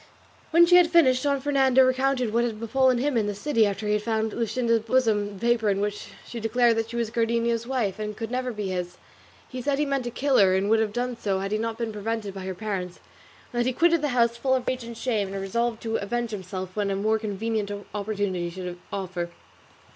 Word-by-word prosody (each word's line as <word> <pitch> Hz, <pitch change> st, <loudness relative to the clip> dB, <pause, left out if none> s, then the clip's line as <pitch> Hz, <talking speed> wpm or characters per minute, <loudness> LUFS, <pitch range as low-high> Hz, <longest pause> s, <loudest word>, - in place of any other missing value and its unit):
When 340 Hz, +1 st, +6 dB
she 355 Hz, +1 st, +6 dB
had 350 Hz, -2 st, +5 dB
finished 265 Hz, -7 st, +4 dB
Don 280 Hz, -1 st, +1 dB
Fernando 265 Hz, -2 st, +4 dB
recounted 255 Hz, -3 st, +1 dB
what 235 Hz, +1 st, +3 dB
had 225 Hz, -3 st, -3 dB
befallen 255 Hz, +2 st, +2 dB
him 275 Hz, +2 st, 0 dB
in 220 Hz, -3 st, +1 dB
the 205 Hz, -, -2 dB
city 225 Hz, -1 st, +2 dB
after 200 Hz, +1 st, -4 dB
he 210 Hz, -, +1 dB
had 210 Hz, -, +1 dB
found 220 Hz, 0 st, -1 dB
in -, -, -5 dB
Luscinda's 230 Hz, 0 st, +1 dB
bosom 220 Hz, -3 st, +1 dB
the 210 Hz, -, -5 dB
paper 235 Hz, -3 st, +2 dB
in 195 Hz, -1 st, +1 dB
which 205 Hz, 0 st, -3 dB, 0.2 s
she 235 Hz, -, -7 dB
declared 230 Hz, +1 st, +2 dB
that 225 Hz, 0 st, -1 dB
she 235 Hz, -, -7 dB
was 230 Hz, -2 st, -1 dB
Cardenio's 235 Hz, 0 st, 0 dB
wife, 230 Hz, -7 st, -1 dB
and 210 Hz, 0 st, -5 dB
never 255 Hz, 0 st, -1 dB
could 230 Hz, -, -7 dB
be 205 Hz, -2 st, -2 dB
his. 180 Hz, -1 st, -4 dB, 0.5 s
He 255 Hz, -1 st, -6 dB
said 280 Hz, +2 st, 0 dB
he 295 Hz, -, +1 dB
meant 275 Hz, -2 st, -1 dB
to -, -, -2 dB
kill 265 Hz, +3 st, +1 dB
her, 190 Hz, -2 st, +5 dB
and 195 Hz, +2 st, +1 dB
would 225 Hz, -, +5 dB
have 220 Hz, -2 st, 0 dB
done 245 Hz, +2 st, -2 dB
so 200 Hz, -4 st, -1 dB
had 195 Hz, +1 st, -3 dB
he 215 Hz, -, 0 dB
not 225 Hz, 0 st, -3 dB
been 230 Hz, -2 st, -3 dB
prevented 210 Hz, -1 st, -3 dB
by 190 Hz, -1 st, -7 dB
her 190 Hz, -1 st, -4 dB
parents, 185 Hz, -3 st, -4 dB, 0.5 s
and 240 Hz, -, -1 dB
that 240 Hz, -, +2 dB
he 255 Hz, -, +1 dB
quitted 335 Hz, +3 st, +3 dB
the 300 Hz, -, +1 dB
house 235 Hz, -3 st, +2 dB
full 260 Hz, +2 st, +1 dB
of 255 Hz, -, -3 dB
rage 255 Hz, -1 st, -1 dB
and 230 Hz, 0 st, -8 dB
shame, 215 Hz, -6 st, -1 dB
and 195 Hz, -, -3 dB
resolved 230 Hz, +4 st, -2 dB
to 225 Hz, -1 st, -1 dB
avenge 235 Hz, +3 st, -2 dB
himself 185 Hz, -2 st, -6 dB
when 205 Hz, -1 st, 0 dB
a 195 Hz, -, 0 dB
more 215 Hz, +3 st, +1 dB
convenient 215 Hz, 0 st, -2 dB, 0.2 s
opportunity 200 Hz, -4 st, -2 dB
should 180 Hz, 0 st, -7 dB
offer. 185 Hz, -3 st, -3 dB
225 Hz, 240 wpm, -25 LUFS, 205-250 Hz, 0.5 s, When